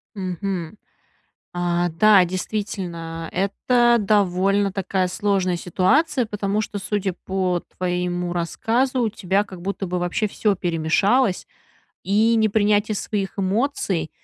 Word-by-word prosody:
Мгм. 185 -1 -4 0.8
А, 175 0 0
да, 195 +3 +5
действительно, 175 -3 -4
это 240 +5 +2
довольно 195 -1 +2
такая 190 -1 -1
сложная 185 -1 0
ситуация, 250 - +1
потому 210 -1 -1
что, 210 -1 -4
судя 200 -1 -2
по 185 -2 0 0.2
твоему 180 -1 -1
рассказу, 235 +9 0
у 230 - +2
тебя, 200 -1 0
как 190 -3 -11
будто 195 +2 -3
бы, 180 0 -2
вообще 175 +5 0
всё 205 0 0
перемешалось. 180 +7 +1 0.6
И 220 +4 +3
непринятие 215 -1 +2
своих 200 -1 -3
эмоций, 195 - -1
195 Hz, 115 wpm, -22 LUFS, 180-210 Hz, 0.8 s, да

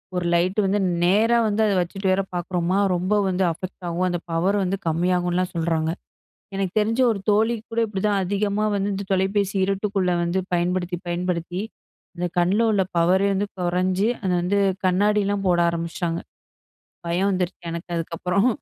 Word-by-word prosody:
ஒரு 180 -1 -1
லைட் 180 +3 +1
வந்து 195 +2 +1 0.2
நேரா 215 +6 +4
வந்து 210 +1 0
அதை 205 -2 +2
வச்சுட்டு 195 +3 -3
வேற 190 +1 +2
பார்க்குறோமா. 175 +1 -1 0.2
ரொம்ப 185 +4 0
வந்து 190 0 0
அஃபெக்ட் 185 +3 -8
ஆகும். 175 +2 0
அந்த 175 -1 -2
பவர் 180 +5 +1
வந்து 190 +1 -1
கம்மியாகும்லாம் 180 +2 +1
சொல்றாங்க. 165 -1 0 0.6
எனக்கு 195 -2 -2
தெரிஞ்சு 225 +4 +1
ஒரு 210 -3 -2
தோழிக்கு 220 +2 +1
கூட 230 - +1
இப்படி 200 -3 -4
தான் 200 -1 +1
அதிகமா 205 +2 0
வந்து 200 0 0
இந்த 200 +1 -4
தொலைபேசி 195 +1 +1
இருட்டுக்குள்ள 195 -1 0
வந்து 170 +2 0 0.2
பயன்படுத்தி, 175 +1 0
பயன்படுத்தி 175 0 -2 0.6
அந்த 180 +1 -1
கண்ல 180 +5 +3
உள்ள 205 -3 +2
பவரே 180 +4 +3
வந்து 200 +2 0
குறைஞ்சு 185 +3 +1 0.2
அதை 190 -2 0
வந்து 185 +3 +1 0.3
கண்ணாடிலாம் 200 +1 +2
போட 175 -1 +3
ஆரம்பிச்சுட்டாங்க. 170 0 -2 0.9
பயம் 180 +4 +1
வந்துருச்சு 180 -1 -2
எனக்கு 170 +2 -7
அதுக்கப்புறம் 180 +6 0
185 Hz, 155 wpm, -23 LUFS, 175-200 Hz, 0.9 s, நேரா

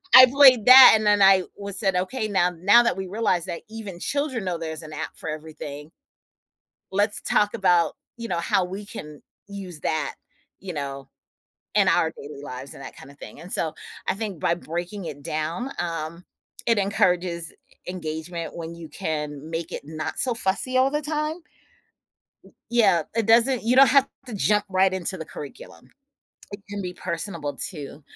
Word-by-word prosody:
I 255 - +12
played 255 -4 +6
that 255 +1 +11
and 215 - 0
then 205 -1 +4
I 195 -1 +6
was 200 +1 -4
said, 195 -4 +1
"Okay, 215 +6 -1
now 180 -3 +2
now 205 +7 +6
that 235 - 0
we 190 -1 -4
realized 190 -4 0
that 170 - -5
even 210 -5 -8
children 280 -1 -2
know 175 -2 -2
there's 160 -1 -6
an 155 - -10
app 150 - -6
for 160 - -5
everything" 155 -1 -8 1.0
"let's 205 +2 0
talk 210 0 +1
about," 180 -3 +2 0.2
you 230 - -6
know, 175 -5 -1
"how 180 +2 +1
we 195 +3 -7
can 150 -6 -9 0.3
use 190 -5 -8
that," 155 -1 -2 0.4
you 185 -2 -7
know, 140 -2 -6 0.7
"in - - +4
our 160 - +3
daily 145 -1 -10
lives," 130 0 -7
and 135 - -11
that - - -9
kinda 140 +1 -13
thing, - - -11
and, 180 - -10
so 160 -2 0 0.3
I - - +1
think 200 -5 -5
by 170 - +1
breaking 175 +4 -5
it 145 -3 -7
down, 165 - -3
um, 170 0 -4 0.4
it 230 -2 +3
encourages 180 -4 +1
e - - -25 0.3
engagement 165 -1 -5
when 170 0 -7
you 170 -1 -9
can 150 -4 -4
make 165 0 -4
it - - -5
not 155 0 -5
so 250 -2 +1
fussy 225 +6 0
all 265 +2 +3
the 295 0 -1
time. 305 +3 -3 1.0
W - - -19 0.2
yeah, 205 -9 +3
it 230 -2 +1
doesn't 230 +2 +4
you 240 +3 +2
don't 275 0 +8
have 275 -1 +4 0.2
to 240 - -7
jump 210 0 +1
right 190 0 +3
into 190 0 -3
the 160 - -7
curriculum. 145 - -11 0.6
It 200 0 -8
can 205 0 -5
be 180 - -5
personable 170 -4 -4
too. 150 -3 -6
185 Hz, 180 wpm, -24 LUFS, 160-215 Hz, 1.0 s, I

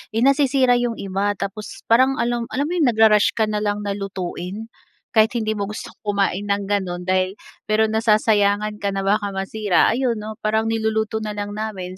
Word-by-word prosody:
eh 225 - +1
nasisira 270 -2 +3
'yong 240 -1 -1
iba 200 +1 -1
tapos 200 +3 -6
parang 260 +3 +5
alam 240 0 -1
alam 280 - 0
mo - - -2
'yong 305 -6 +3
nag-ru-rush 220 -2 +4
ka 220 - +3
na 210 -1 -1
lang 205 0 -1
na 200 - -2
lutuin 195 +2 -5 0.4
kahit 220 0 +3
hindi 220 -2 0
mo 200 - -1
gustong 210 - -8
kumain 200 -1 0
ng 200 0 0
gano'n 185 -3 -1
dahil 185 0 0 0.3
pero 220 +1 +2
nasasayangan 210 -1 +2
ka 200 -1 -2
na 195 - -1
baka 205 0 0
masira, 195 0 +1
ayon 245 0 0
'no 215 +1 -7
parang 220 +1 0
niluluto 220 0 -1
na 215 -1 -4
lang 205 0 -4
namin. 190 -4 -5
215 Hz, 185 wpm, -21 LUFS, 200-225 Hz, 0.4 s, parang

